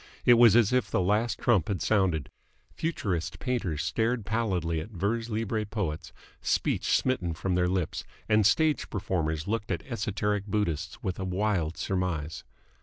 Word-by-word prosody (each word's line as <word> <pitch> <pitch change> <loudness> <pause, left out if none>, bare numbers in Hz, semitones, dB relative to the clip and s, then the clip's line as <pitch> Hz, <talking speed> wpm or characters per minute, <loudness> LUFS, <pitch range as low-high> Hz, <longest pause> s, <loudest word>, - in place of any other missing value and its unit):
It 120 - +8
was 115 -2 +7
as 120 -1 +4
if 125 -1 +2
the - - +1
last 105 +4 +1
trump 105 -10 +2
had 100 -3 -1
sounded. 95 -9 +1 0.4
Futurist 100 - -2
painters 95 - -2
stared 110 +7 0
pallidly 95 -8 0
at 80 - -6
vers 110 +4 -2
libre 110 0 -1
poets, 100 -7 -4 0.3
speech - - 0
smitten 90 -11 -1
from 90 +5 -2
their 90 0 +2
lips; 90 -3 -1 0.2
and 110 0 +4
stage 155 +8 +2
performers 80 -5 -2
looked 105 0 -2
at 90 - -2
esoteric 105 -3 -2
Buddhists 85 -7 -2
with 95 -1 -3
a - - -2
wild 95 -3 0
surmise. 90 -5 -2
100 Hz, 155 wpm, -28 LUFS, 85-110 Hz, 0.4 s, It